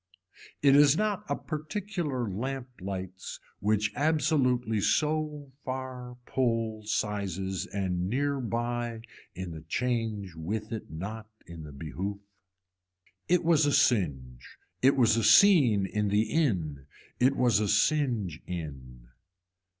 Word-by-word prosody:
It 140 -1 +6
is 145 +1 +6
not 210 -1 -1
a - - +1
particular 155 - -3
lamp 130 +6 -4
lights 95 -1 -6 0.2
which 105 0 +1
absolutely 135 -8 +1
so 150 +1 0
far 130 -1 -6
pull 115 -4 0
sizes 95 -3 -2
and 90 -2 -2
near 140 +4 0
by 120 -1 -2 0.3
in 95 -1 -5
the 80 -1 -8
change 110 0 -2
with 105 +7 -4
it 110 - -5
not 105 +8 -6 0.2
in 85 -1 -9
the 75 -1 -9
behoof. 85 +8 -5 1.1
It 180 +1 +3
was 160 -3 +4
a - - +2
singe, 70 - 0 0.2
it 135 +2 +5
was 115 -3 +4
a 115 - +1
scene 135 - +6
in 105 +2 -1
the 105 +2 +3
in, 90 - -1 0.3
it 130 +2 +4
was 120 -5 +3
a 105 - 0
singe 105 - +1
in. 65 -8 -7
110 Hz, 125 wpm, -29 LUFS, 95-135 Hz, 1.1 s, It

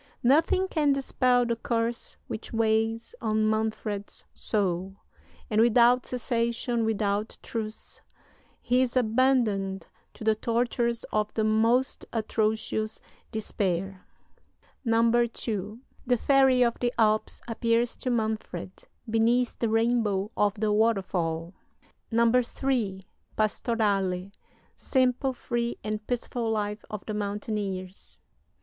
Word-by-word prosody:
Nothing 320 +8 +3
can 300 -6 +2
dispel 255 -2 +2
the 235 0 0
curse 230 0 -2
which 220 - -6
weighs 225 0 0
on 215 -1 +1
Manfred's 215 -2 -2
soul; 190 -2 -1 0.5
and 215 -1 +2
without 240 +2 +5
cessation, 235 -1 -1
without 210 -1 -1
truce, 220 -1 -6 0.6
he 250 +1 +3
is 255 0 0
abandoned 220 -6 +2 0.3
to - - -9
the 220 0 +4
tortures 235 +1 0
of 215 0 +1
the 220 - +1
most 225 +4 +2
atrocious 220 0 -1 0.3
despair. 195 -3 -2 0.8
"II. 230 -3 +1 0.3
The 245 0 +3
Fairy 265 -2 +4
of 235 -1 0
the 240 -1 +1
Alps 215 -1 +2
appears 230 +1 +1
to 255 - -3
Manfred 220 -5 -2 0.4
beneath 230 +2 +2
the 230 - +1
rainbow 225 -3 +1
of 205 -1 +2
the 210 0 0
waterfall. 185 -6 0 0.6
"III. 235 -3 +1 0.3
Pastorale. 200 -4 0 0.4
Simple, 260 0 +1
free, 240 -1 -2
and 215 0 -4
peaceful 240 -1 -2
life 210 -1 -2
of 210 -2 -6
the 215 - -4
mountaineers. 200 -2 -4
225 Hz, 105 wpm, -27 LUFS, 210-240 Hz, 0.8 s, without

